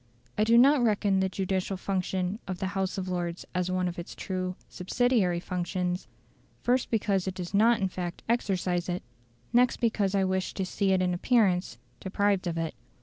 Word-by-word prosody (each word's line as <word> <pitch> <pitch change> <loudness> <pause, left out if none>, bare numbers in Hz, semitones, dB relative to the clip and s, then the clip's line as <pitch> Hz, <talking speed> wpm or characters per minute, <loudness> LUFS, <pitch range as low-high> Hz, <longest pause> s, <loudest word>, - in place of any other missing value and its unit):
I 215 - +2
do 230 +2 +5
not 275 +3 +6
reckon 205 -4 +2
the 190 0 +1
judicial 190 0 -2
function 185 +1 -2
of 185 - -3
the 190 +1 -2
House 190 0 -1
of 190 -1 -3
Lords 175 -1 -3
as 180 0 0
one 185 0 0
of 175 0 -4
its 170 - -7
true 185 -1 -3
subsidiary 190 -2 +1
functions, 180 0 -2 0.6
first 250 +1 +2
because 200 -4 +1
it 185 - -3
does 180 0 -6
not 225 +3 +4
in 195 - +1
fact 180 -2 -5
exercise 185 -6 0
it, 180 +1 -2 0.5
next 245 +1 +4
because 205 -4 +1
I 195 - +3
wish 190 0 -1
to 190 - -1
see 195 +1 0
it 185 -1 +3
in 180 -1 +1
appearance 185 - +2 0.2
deprived 195 -1 0
of 165 -1 -2
it. 165 -1 -2
190 Hz, 185 wpm, -28 LUFS, 180-205 Hz, 0.6 s, not